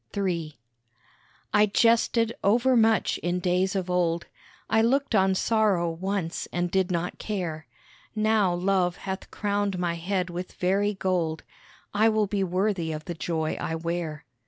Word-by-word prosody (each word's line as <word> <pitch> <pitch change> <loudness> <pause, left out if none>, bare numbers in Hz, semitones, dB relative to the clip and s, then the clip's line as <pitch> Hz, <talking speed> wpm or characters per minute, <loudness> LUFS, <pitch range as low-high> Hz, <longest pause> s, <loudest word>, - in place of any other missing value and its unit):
III 170 -6 -2 1.0
I 210 0 +5
jested 230 +1 +3
over 245 +6 +3
much 225 -1 +3
in 175 +1 -1
days 180 +2 +1
of 190 -2 -1
old, 170 -2 0 0.4
I 220 - +3
looked 270 +3 +1
on 190 -2 +3
sorrow 200 -5 +2
once 180 0 -3
and 175 0 -1
did 190 0 +1
not 175 0 -2
care, 170 -7 -4 0.5
Now 215 -3 +2
Love 180 0 +1
hath 190 0 -5
crowned 205 -2 -1
my 175 -1 0
head 180 +1 -2
with 180 +1 -6
very 200 +3 +1
gold, 175 -4 -1 0.5
I 215 +2 +4
will 215 -1 +2
be 200 0 -1
worthy 185 -2 0
of 155 0 -6
the 175 - -4
joy 160 -1 -2
I 160 - -2
wear. 165 -2 -4
185 Hz, 150 wpm, -26 LUFS, 175-205 Hz, 1.0 s, I